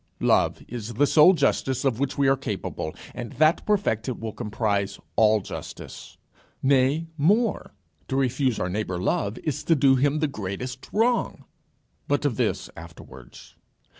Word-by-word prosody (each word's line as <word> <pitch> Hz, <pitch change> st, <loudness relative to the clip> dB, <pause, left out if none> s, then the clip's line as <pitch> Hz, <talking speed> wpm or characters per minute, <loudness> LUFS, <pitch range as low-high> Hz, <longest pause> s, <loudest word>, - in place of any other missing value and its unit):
It -, -, +2 dB
is 120 Hz, -1 st, -6 dB
the 145 Hz, -, +4 dB
sole 155 Hz, +5 st, +6 dB
justice 135 Hz, -6 st, 0 dB
of 125 Hz, -4 st, +1 dB
which 140 Hz, -1 st, -2 dB
we 140 Hz, -1 st, +3 dB
are 135 Hz, -, +5 dB
capable, 100 Hz, -, -5 dB, 0.2 s
and 120 Hz, -2 st, -7 dB
that 155 Hz, +2 st, +3 dB
perfected 130 Hz, -, 0 dB
will 115 Hz, -1 st, -4 dB
comprise 105 Hz, -3 st, -2 dB, 0.2 s
all 110 Hz, -1 st, +4 dB
justice. -, -, -9 dB, 0.5 s
Nay 135 Hz, +4 st, +3 dB
more, 205 Hz, -, +1 dB, 0.3 s
to 130 Hz, -, -3 dB
refuse 130 Hz, -2 st, +1 dB
our 90 Hz, -, -1 dB
neighbour 90 Hz, -1 st, -3 dB
love, 100 Hz, +4 st, -1 dB
is 150 Hz, -1 st, -2 dB
to 165 Hz, -, +4 dB
do 135 Hz, -2 st, +4 dB
him 145 Hz, +3 st, +2 dB
the 155 Hz, 0 st, +1 dB
greatest 125 Hz, +2 st, -6 dB
wrong. 235 Hz, +3 st, 0 dB, 0.6 s
But 145 Hz, +1 st, 0 dB
of 130 Hz, -6 st, 0 dB
this -, -, -1 dB
afterwards. 65 Hz, -7 st, -13 dB
130 Hz, 150 wpm, -25 LUFS, 105-145 Hz, 0.6 s, sole